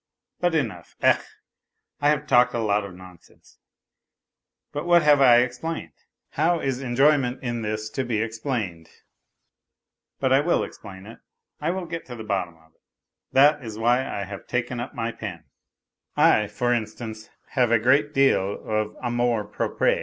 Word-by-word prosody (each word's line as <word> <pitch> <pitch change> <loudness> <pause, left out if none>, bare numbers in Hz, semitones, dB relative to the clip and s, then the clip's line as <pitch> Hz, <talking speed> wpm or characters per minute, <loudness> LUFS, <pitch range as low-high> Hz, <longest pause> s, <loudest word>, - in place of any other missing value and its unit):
But 175 -2 +1
enough.... 110 - -3
Ech, - - +4 0.8
I 145 - +3
have 150 0 +1
talked 125 -2 +4
a - - 0
lot 105 -2 +1
of 95 -3 -9
nonsense, 90 -1 -17 1.1
but 150 +3 -4
what 175 -2 +5
have 145 -2 +5
I 120 -2 +7
explained? 125 - -4 0.4
How 165 +3 +1
is 135 -3 -2
enjoyment 135 0 +2
in 120 -2 -2
this 110 0 -3
to 135 - -2
be 120 -4 -1
explained? 110 - -3 1.3
But 130 -1 +2
I 135 - +6
will 170 +4 +1
explain 95 -2 -10
it. 115 +2 -12 0.4
I 150 - -1
will 185 +1 -2
get 165 0 -6
to 125 - -7
the 110 - -8
bottom 95 -5 -2
of 80 -1 -26
it! - - -42 0.5
That 145 +1 +5
is 110 -2 -7
why 120 +2 +3
I 100 - -4
have 100 -2 -9
taken 125 0 -2
up 120 - -6
my 115 -1 -2
pen.... 90 -9 -7 0.7
I, 105 - +4
for 120 +4 0
instance, 110 -1 -5 0.2
have 125 -3 +1
a 115 - +6
great 130 +6 +3
deal 135 -9 +2
of 110 -1 -1
amour 120 -2 0
propre. 105 - 0
120 Hz, 165 wpm, -24 LUFS, 105-135 Hz, 1.3 s, I